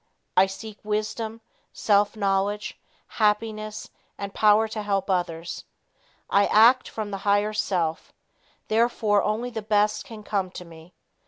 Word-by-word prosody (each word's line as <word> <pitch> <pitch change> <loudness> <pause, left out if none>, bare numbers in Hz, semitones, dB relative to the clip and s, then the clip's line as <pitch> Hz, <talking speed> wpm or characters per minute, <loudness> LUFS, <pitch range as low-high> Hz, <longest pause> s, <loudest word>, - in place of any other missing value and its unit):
I 190 +1 +6
seek 210 +2 -9
wisdom, 215 +1 -3 0.3
self 205 +1 +2
knowledge, 200 0 -1 0.3
happiness 215 0 -1 0.3
and 200 0 -6
power 215 +1 +4
to 220 0 -5
help 195 -1 -1
others. 175 -2 -3 0.6
I 200 0 +3
act 240 +4 +5
from 215 -2 -5
the 195 - -3
higher 205 +1 +1
self, 175 -6 -1 0.6
therefore 220 -2 +2
only 225 +4 -2
the 225 -2 -4
best 210 0 +1
can 220 -2 -11
come 195 -3 -1
to 180 - -8
me. 165 +1 -15
210 Hz, 135 wpm, -25 LUFS, 195-215 Hz, 0.6 s, I